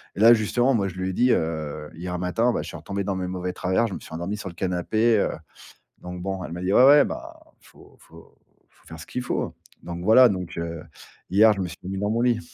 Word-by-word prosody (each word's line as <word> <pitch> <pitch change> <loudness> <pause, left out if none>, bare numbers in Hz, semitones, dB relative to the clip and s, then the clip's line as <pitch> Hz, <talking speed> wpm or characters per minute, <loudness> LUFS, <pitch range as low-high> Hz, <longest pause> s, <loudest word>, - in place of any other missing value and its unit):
Et - - -7
là, 115 +2 +8
justement, 120 +4 +1
moi, 100 -4 +1
je 95 - -7
lui 95 0 -3
ai - - -3
dit, 125 +4 +3
heu: 75 -2 -2
«Hier 90 +1 -5
matin, 115 +7 +1
bah, - - -1
je 80 - -8
suis 85 - -7
retombé 100 +5 -4
dans 95 -1 -2
mes 90 -1 -3
mauvais 90 0 -4
travers, 95 +6 0
je 100 - -7
me - - -5
suis - - -13
endormi 85 +6 -4
sur 95 - -6
le 85 - -13
canapé, 105 +6 +1
heu». - - +1 0.7
Donc 90 0 -7
bon, 95 0 -4
elle 85 - -7
m'a 90 - -6
dit: 95 +2 0
«Ouais, 130 - +7
ouais, 145 +1 +7
bah, - - -7 0.2
il - - -24
faut - - -19
il - - -21
faut 80 0 -18 0.3
il - - -40
faut - - -28
faire 80 0 -10
ce 85 - -9
qu'il 125 - -4
faut». 125 - -3 0.3
Donc 85 +1 -6
voilà, 120 +5 +7
donc, 90 -5 -4
heu, 85 -1 -5 0.5
hier, 110 +3 +5
je 100 - -4
me 90 - -2
suis 90 - -10
mis 95 +1 -5
dans 105 - -1
mon 115 +2 0
lit. 120 -2 +2
95 Hz, 275 wpm, -24 LUFS, 85-110 Hz, 0.7 s, là